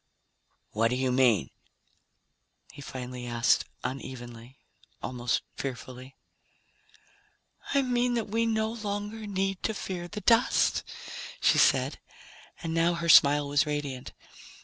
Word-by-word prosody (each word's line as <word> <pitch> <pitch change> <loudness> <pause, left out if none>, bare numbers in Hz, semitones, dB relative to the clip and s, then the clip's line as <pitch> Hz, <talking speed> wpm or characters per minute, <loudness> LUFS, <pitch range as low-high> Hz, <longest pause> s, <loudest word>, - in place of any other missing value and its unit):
"What 115 +2 +2
do 125 - -1
you 130 0 0
mean?" 125 - +3 1.2
he - - -12
finally 125 -2 -7
asked 120 0 +2 0.2
unevenly, 125 -1 -7 0.4
almost 125 -1 -2
fearfully. 130 0 -7 1.6
"I 280 - +4
mean 245 -1 +1
that 230 -3 -1
we 225 +2 0
no 220 -1 0
longer 210 0 -5
need 195 -1 -2
to 220 - -1
fear 180 -3 -5
the 210 +4 -7
dust," 230 +2 +3 0.6
she - - +4
said, - - +3 0.6
and 165 -1 -2
now 165 +1 +2
her 170 0 -3
smile 145 -1 +7
was 145 +1 +2
radiant. 145 -4 -4
145 Hz, 120 wpm, -28 LUFS, 125-205 Hz, 1.6 s, smile